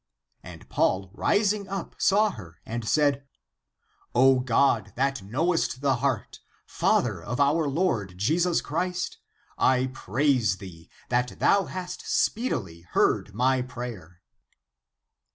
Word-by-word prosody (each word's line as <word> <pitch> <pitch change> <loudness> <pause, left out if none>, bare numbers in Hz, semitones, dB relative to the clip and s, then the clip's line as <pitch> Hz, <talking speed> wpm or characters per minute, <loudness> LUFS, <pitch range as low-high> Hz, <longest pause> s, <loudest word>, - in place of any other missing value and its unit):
^^ - - -58 0.4
And - - -12
Paul 95 0 0
rising 205 - +1
up, 195 -2 -5
saw 210 +2 +3
her, 90 - -12
and 115 -1 -4
said, 145 -2 +2 0.5
" - - -39
O 130 +1 +5
God, 125 -3 +2
that 135 -1 0
knowest 135 - -1
the 135 -3 +2
heart, 130 -3 -2 0.3
Father - - +1
of 120 +5 -5
[our 145 +2 +3
Lord] 135 - 0
^^ - - -18
Jesus 165 - +1
Christ; 180 +3 -3 0.4
I 130 0 +2
praise 125 -4 +1
thee, 85 -4 -12 0.2
that 125 -5 0
thou 200 -1 +3
hast 185 0 -6
speedily 95 - -1
heard - - +1
my 130 +2 +2
prayer." 115 -9 -8
130 Hz, 130 wpm, -26 LUFS, 110-165 Hz, 0.5 s, O